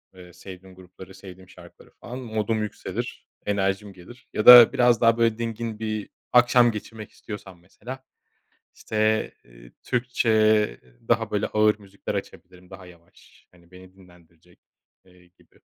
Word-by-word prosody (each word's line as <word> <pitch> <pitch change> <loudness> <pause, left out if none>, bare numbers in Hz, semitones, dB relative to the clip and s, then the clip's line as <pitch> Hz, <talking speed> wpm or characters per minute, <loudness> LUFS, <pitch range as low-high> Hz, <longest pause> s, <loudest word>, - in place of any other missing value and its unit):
eee, 90 -1 -15
sevdiğim 95 +1 -13
grupları, 95 +1 -15
sevdiğim 95 -1 -14
şarkıları - - -17
falan. 125 +2 -8
Modum 110 -2 -3
yükselir, 105 - -7 0.2
enerjim 100 0 -2
gelir 95 +8 -16
ya 105 - -3
da 120 -2 +10
biraz 120 -2 +2
daha 115 0 +3
böyle 115 -1 +1
dingin 115 -1 -5
bir 110 -2 -5 0.2
akşam 120 -1 +5
geçirmek 110 0 -9
istiyorsam 95 -4 -11
mesela, 125 +9 -11 0.7
işte, 110 0 -1
eee, - - -18
Türkçe, 110 -4 +1 0.3
daha - - 0
böyle 105 0 -1
ağır 105 0 +1
müzikler 100 +1 -8
açabilirim, 90 -2 -9
daha 95 -1 -12
yavaş, 85 -1 -21
hani, 85 -1 -24
beni 95 0 -16
dinlendirecek, 90 -2 -23 0.5
eee, 90 -1 -23
gibi. 90 - -29
105 Hz, 135 wpm, -23 LUFS, 90-110 Hz, 0.7 s, da